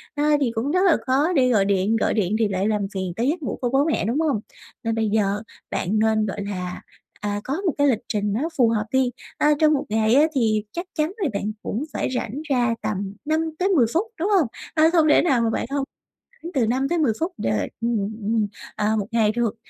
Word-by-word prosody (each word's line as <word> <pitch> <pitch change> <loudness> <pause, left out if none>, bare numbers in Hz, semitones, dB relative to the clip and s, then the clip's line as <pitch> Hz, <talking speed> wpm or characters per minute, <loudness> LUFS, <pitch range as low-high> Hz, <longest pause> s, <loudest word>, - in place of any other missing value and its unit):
ờ, 290 - 0 0.2
thì 250 -4 +1
cũng 240 +6 -1
rất 365 +3 +2
là 350 - +5
khó 285 +7 +2
để 255 -3 +4
gọi 210 -5 +3
điện, 200 +2 +2
gọi - - +1
điện 210 -1 0
thì 225 - +3
lại 195 0 -1
làm 210 -1 +1
phiền 185 -2 -3
tới 235 +5 0
giấc 325 +3 -1
ngủ - - -3
của 245 - 0
bố 270 +3 +2
mẹ, 315 -10 0
đúng 235 +8 0
hông? 300 -8 +1 0.4
Nên 225 -1 -1
bây 220 -1 0
giờ 205 -1 +1 0.3
bạn 205 +4 0
nên, 220 0 +2
gọi 205 0 -4
là, 180 -2 -5 0.4
à, 205 0 -2
có 290 +8 -3
một 340 - +2
cái 285 0 +4
lịch 240 -6 +2
trình 205 -1 -1
nó 280 +10 -1
phù 240 -4 +5
hợp 215 -2 0
đi, 260 -1 +2 0.3
a, 300 - +3
trong 310 -1 +5
1 280 - 0
ngày 220 +2 +2
á, 290 - +6
thì 220 -4 +2
chắc 345 +2 -4
chắn 305 +2 +1
là 375 -9 0
bạn 200 +1 -2
cũng 230 +7 -2
phải - - -1
rảnh 245 +3 -3
ra 245 -4 +2
tầm 200 -1 -3
5-10 320 0 +1
phút 340 - +2 0.2
đúng 365 +5 0
hông? 375 - +4 0.3
Ờ, 315 - +4
không 325 -3 +4
thể - - +6
nào 270 -8 +2
mà 230 - +2
bạn - - -1
không 280 -1 0 0.7
từ 250 -5 +2
5-10 270 +2 +1
phút 330 +4 -1
được, 110 -2 0 0.2
ừm, 235 0 +1 0.3
ừm, 215 0 +1 0.3
à, 210 +1 +1
1 200 - -3
ngày 225 -2 +3
được. 235 -1 -1
235 Hz, 230 wpm, -23 LUFS, 210-295 Hz, 0.7 s, á